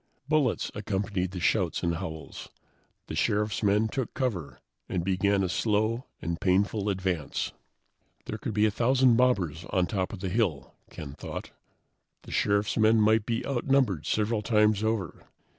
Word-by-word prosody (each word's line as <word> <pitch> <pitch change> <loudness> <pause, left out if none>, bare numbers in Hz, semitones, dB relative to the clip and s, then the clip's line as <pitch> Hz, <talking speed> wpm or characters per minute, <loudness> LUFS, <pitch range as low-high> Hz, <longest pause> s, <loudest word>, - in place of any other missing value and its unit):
Bullets 150 -5 +1
accompanied 100 -3 -2
the 95 0 -6
shouts 90 -1 +1
and 85 -1 0
howls. 80 -3 -7 0.6
The - - -7
Sheriff's 105 0 0
men 105 +1 +3
took 125 +2 -4
cover 110 - -2 0.3
and 90 - -1
began 95 +1 +2
a - - +1
slow 110 +5 0 0.2
and 85 +1 -3
painful 100 +2 +1
advance. 95 -6 -2 0.7
There 110 - -5
could 110 0 -4
be 105 0 +4
a 110 - +2
thousand 125 +2 +4
mobbers 95 -11 +1
on 90 -1 +2
top 95 -1 -2
of - - -8
the 95 - -2
hill, 90 - -1 0.2
Ken 70 -3 -8
thought. - - -7 0.7
The - - -11
Sheriff's 100 +1 +1
men 110 0 +5
might 110 0 +3
be 115 -1 -1
outnumbered 130 - +1
several 105 +1 +1
times 105 -1 +3
over. 110 -6 -2
105 Hz, 155 wpm, -28 LUFS, 95-110 Hz, 0.7 s, men